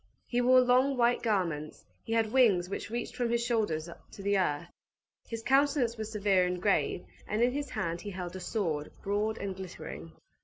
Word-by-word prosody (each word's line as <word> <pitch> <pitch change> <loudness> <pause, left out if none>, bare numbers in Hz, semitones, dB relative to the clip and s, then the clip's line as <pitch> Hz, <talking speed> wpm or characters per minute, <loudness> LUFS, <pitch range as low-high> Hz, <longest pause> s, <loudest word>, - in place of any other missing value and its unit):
He 245 0 0
wore 255 +1 +6
long, 255 +2 +3
white 240 0 +3
garments; 170 -9 -1 0.2
he 225 - -3
had 225 -1 +2
wings 215 -9 +4
which 200 - -4
reached 235 +2 -4
from 245 -1 0
his 235 0 +1
shoulders 210 -10 0 0.3
to 200 - -9
the 200 +1 +2
earth; 170 -4 0 0.6
his 230 -1 -5
countenance 270 -2 +3
was 220 -1 -5
severe 200 -4 +2
and 180 0 -2
grave; 195 -2 +1 0.2
and 215 +3 +1
in 245 - +3
his 285 +1 -3
hand 170 -7 -3
he 205 - -6
held 180 -2 -6
a - - -5
sword, 165 -7 -2
broad 210 +2 0
and 195 -1 -4
glittering. 85 - -8
210 Hz, 190 wpm, -30 LUFS, 180-240 Hz, 0.6 s, wore